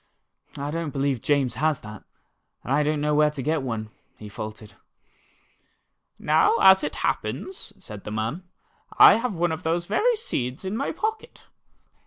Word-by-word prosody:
I 145 +1 -4
don't 165 -1 -3
believe 135 -3 -1
James 140 -5 +1
has 155 -2 0
that, 105 -1 -10 0.6
and 130 - -2
I 145 - +3
don't 150 0 0
know 150 0 +1
where 150 0 +4
to 150 -2 -6
get 155 +2 0
one," 110 -4 -4 0.3
he 105 - -10
faltered. 105 0 -8 1.4
"Now, 155 +7 +3
as 190 0 +7
it - - -3
happens," 380 - -3
said 105 - -10
the - - -7
man, 110 +10 -3 0.6
"I - - +9
have 230 -3 -2
one 170 0 0
of 160 - -4
those 170 +2 -1
very 455 - +2
seeds 130 - -4
in 190 +3 -3
my 275 +5 -2
pocket. 435 +5 -4
150 Hz, 165 wpm, -24 LUFS, 125-185 Hz, 1.4 s, I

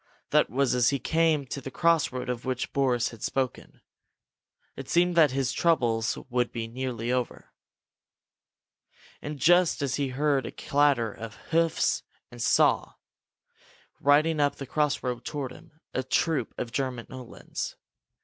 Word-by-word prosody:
That - - +4
was 135 +2 +1
as 125 -1 +4
he 140 - 0
came 160 +1 +1
to 135 +2 -6
the 135 - -6
crossroad 145 -5 +1
of 125 -1 -3
which 130 -1 -3
Boris 125 -4 +1
had 115 -3 -13
spoken. 130 -2 -3 0.9
It - - -8
seemed 175 +1 +3
that 160 -3 +6
his 135 -1 -1
troubles 120 -9 +1
must 125 -1 +1
be 115 -1 -4
nearly 120 -1 -3
over. 125 -1 -3 1.7
And 150 0 -5
just 175 +3 +4
then 140 -2 -1
he 140 +2 -1
heard 135 -1 0
a - - -6
clatter 140 -6 +1
of 110 -2 -8 0.2
hoofs 165 0 +2 0.3
and 120 -1 -9
saw, - - +3 1.1
riding 150 +2 +3
up 145 -1 +2
the 135 - -7
crossroad 130 -4 -1
toward 140 -2 -4
him, 155 +4 -16
a 130 - 0
troop 140 -1 0
of 120 - -4
German 125 -2 -2
Uhlans. 130 -2 -6
135 Hz, 145 wpm, -27 LUFS, 125-150 Hz, 1.7 s, that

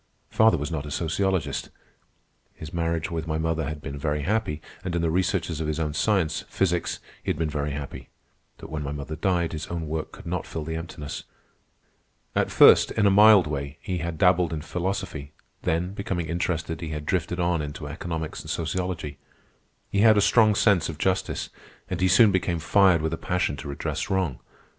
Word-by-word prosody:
Father 110 -4 +5
was 75 +3 -4
not 75 -2 -3
a - - -5
sociologist. 90 +3 -1 0.9
His 80 0 -9
marriage 85 0 -1
with 80 -1 -3
my 80 -1 -1
mother 80 0 -1
had 75 +1 -5
been 70 +1 -6
very 75 -1 -1
happy, 95 -4 0 0.2
and 90 -2 -3
in 85 - 0
the 80 - +1
researches 85 -2 0
of 80 - -2
his 75 +1 -2
own 75 -2 -1
science, 85 -2 +1
physics, 90 -3 0 0.2
he - - -5
had - - 0
been 80 -1 -1
very 75 0 -2
happy. 70 -1 -6 0.5
But - - -11
when 75 -1 -3
mother 75 +2 -5
died, 85 -2 0
his 80 +1 -5
own 85 -2 -4
work 80 +1 -3
could - - -13
not 90 0 -3
fill 80 - -5
the 80 +1 -4
emptiness. 80 -3 -6 1.1
At - - +2
first, - - +7
in 105 - +1
a 100 - +5
mild 105 -2 +7
way, 70 0 -4
he 90 -2 -3
had 85 -1 -4
dabbled 90 -1 +4
in 75 -2 -4
philosophy; 90 -5 -4 0.3
then, 90 +4 -1
becoming 95 -4 -3
interested, 85 0 -2
he 80 - -4
had 75 -1 -5
drifted 90 +1 -1
on 85 -2 +1
into 75 0 -6
economics 80 +2 -4
and - - -10
sociology. 80 -4 -3 0.7
He 100 - +1
had 110 0 +6
a - - +6
strong 110 0 +5
sense 95 -6 +3
of 80 - -6
justice, 95 +3 -1 0.4
and 90 -1 -2
he 95 - +4
soon 100 +4 +6
became 90 -2 0
fired 90 0 +4
with 80 0 -1
a - - -2
passion 90 -5 -1
to 75 - -7
redress 70 - -3
wrong. 95 -9 0
85 Hz, 195 wpm, -25 LUFS, 75-90 Hz, 1.1 s, first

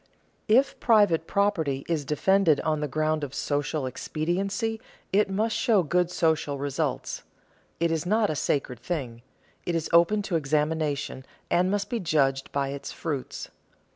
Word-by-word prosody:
_ - - -37 0.4
If 255 +6 +3
private 205 -9 +4
property 160 -9 0
is 160 -4 -1
defended 165 +2 +3
on 155 -1 0
the 150 - -1
ground 155 +2 0
of 140 -1 -5
social 145 0 -1
expediency, 195 - -2 0.3
it 205 0 +3
must 215 +3 0
show 220 -7 +3
good 175 +3 +1
social 160 -5 0
results. 140 0 -2 0.6
It 170 0 +1
is 160 -2 0
not 210 +2 +2
a - - -2
sacred 135 -4 -1
thing; 125 -5 -4 0.4
it 175 - -2
is 165 - -2
open 190 +5 +4
to 180 -4 0
examination, 150 -2 -1 0.3
and 180 +1 +3
must 200 0 0
be 240 - -2
judged 135 -6 +1
by 140 -1 -1
its 140 0 -6
fruits. 145 -6 -5
160 Hz, 155 wpm, -26 LUFS, 145-195 Hz, 0.6 s, private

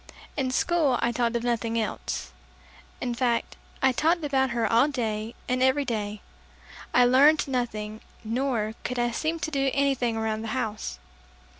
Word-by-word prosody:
In 265 -3 0
school 290 -1 +2
I 240 - +1
talked 235 -1 0
of 235 - -1
nothing 230 -1 0
else. 65 - -3 0.7
In 245 -1 -2
fact, 235 -1 0 0.3
I 265 - +6
talked 325 +6 +1
about 265 -2 +2
her 235 -1 0
all 230 +5 +4
day 225 -5 -3
and 255 0 0
every 260 +2 +3
day. 210 -3 -3 0.7
I 245 - +5
learned 285 +5 +5
nothing, 220 -4 -3 0.2
nor 230 -2 -1
could 250 - -3
I 240 0 +1
seem 315 +7 -1
to 320 0 -2
do 275 -2 +1
anything 265 -5 +1
around 220 -1 -1
the 225 - -5
house. 215 - -3
245 Hz, 160 wpm, -26 LUFS, 225-270 Hz, 0.7 s, I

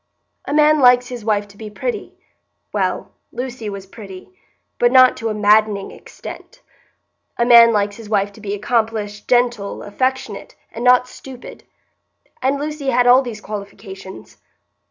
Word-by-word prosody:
A - - -5
man 305 0 +4
likes 250 -1 +5
his 245 -3 -7
wife 210 -1 0
to 200 - -18
be 215 0 -8
pretty; 445 - -5 0.6
well, - - -2 0.2
Lucy 245 -3 -5
was 200 -1 -7
pretty, 195 - -12 0.5
but 240 0 +3
not 255 -1 +6
to 225 - -3
a - - -2
maddening 210 -1 +2
extent. - - -12 0.7
A 235 - +2
man 235 -1 +8
likes 205 -1 -1
his 225 -2 -11
wife 200 -1 0
to 215 - -15
be 205 -1 -3
accomplished, 215 -1 -2
gentle, 240 -5 0
affectionate, 255 0 -3 0.2
and 230 - -7
not 250 0 +5
stupid; 255 0 -12 0.8
and 270 +2 0
Lucy 300 -1 -5
had 250 -2 +3
all 250 +2 +6
these 235 -5 -7
qualifications. 200 -2 -9
225 Hz, 150 wpm, -19 LUFS, 205-250 Hz, 0.8 s, man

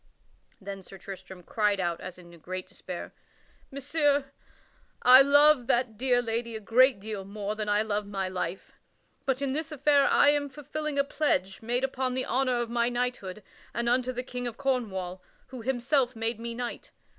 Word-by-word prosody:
Then 195 0 -7
Sir 195 +1 -12
Tristram 190 -1 -10
cried 210 +1 +1
out 175 -2 -1
as 185 -1 -7
in 175 -1 -14
great 185 +3 -5
despair: - - -8 0.6
"Messire, 285 0 +1 0.7
I 255 +2 +10
love 285 -2 +5
that 240 -2 +1
dear 245 +1 +2
lady 230 0 -2
a - - -4
great 245 +3 +4
deal 210 -1 -5
more 205 +1 -4
than 215 -1 -3
I 205 +1 +3
love 210 -1 -2
my 195 -2 -2
life; 185 0 -4 0.6
but 265 +1 0
in 270 -1 0
this 310 +1 -3
affair 285 -1 +3
I - - +5
am 290 -1 +1
fulfilling 300 +1 -5
a 280 - +4
pledge 195 -10 -1
made 240 +3 -1
upon 260 -1 -1
the 255 - -1
honor 255 -1 +1
of 235 - -3
my 235 0 +2
knighthood 240 -5 -3 0.3
and 235 +1 -1
unto 250 +1 +2
the 250 0 -4
King 250 -1 -5
of 235 -1 -6
Cornwall, 200 -10 -2 0.3
who 255 -2 -8
himself 255 +1 +1
made 225 0 -2
me 235 0 -5
knight. 245 0 -5
240 Hz, 180 wpm, -28 LUFS, 205-265 Hz, 0.7 s, I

